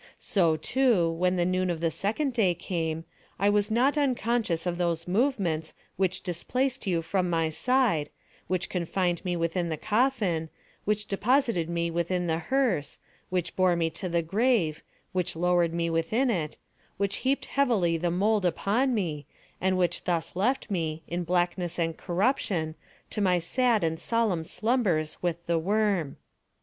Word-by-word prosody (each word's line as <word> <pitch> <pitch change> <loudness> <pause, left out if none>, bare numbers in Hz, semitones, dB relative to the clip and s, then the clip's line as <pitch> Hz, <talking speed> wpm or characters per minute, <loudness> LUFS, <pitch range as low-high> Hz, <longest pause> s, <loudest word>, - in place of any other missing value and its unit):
So, 170 -5 +2
too, 210 - +2
when 180 +2 +1
the 175 -1 +1
noon 185 0 +1
of 170 -2 -1
the 165 0 0
second 220 - -1
day 195 -7 +2
came, 165 -2 -3 0.3
I 200 +2 +3
was 205 0 +2
not 260 +7 +2
unconscious 235 - 0
of 175 0 -2
those 170 -1 -1
movements 180 - 0 0.2
which 190 0 0
displaced 250 +8 -2
you 170 -3 +1
from 180 +2 0
my 165 -2 +1
side, 220 - +1 0.4
which 185 -1 -1
confined 175 0 -1
me 180 -2 -1
within 170 +1 -1
the 160 - -2
coffin, 210 - +1 0.4
which 210 0 0
deposited 225 - +1
me 170 0 -1
within 175 +2 -1
the 165 -1 0
hearse, 225 - 0 0.3
which 180 -2 -2
bore 185 -2 +3
me 165 -1 0
to 180 +3 -4
the 170 0 +1
grave, 195 -3 +1 0.3
which 180 -2 -1
lowered 175 0 +2
me 170 0 -1
within 190 +11 +1
it, 160 -7 -2 0.4
which 200 0 0
heaped 270 +2 0
heavily 225 -12 +2
the 175 +2 0
mould 205 +4 +2
upon 215 - +1
me, 155 -9 -2 0.3
and 185 0 +2
which 180 -1 0
thus 170 -2 -1
left 230 +5 0
me, 160 -4 -2
in 175 +1 -2
blackness 175 0 0
and 165 -2 0
corruption, 180 - 0 0.4
to 210 - -2
my 185 -2 +3
sad 225 +5 +1
and 160 0 0
solemn 225 -8 0
slumbers 195 -6 0
with 170 -1 -2
the 170 -1 +1
worm. 195 -4 0
180 Hz, 160 wpm, -27 LUFS, 165-215 Hz, 0.4 s, I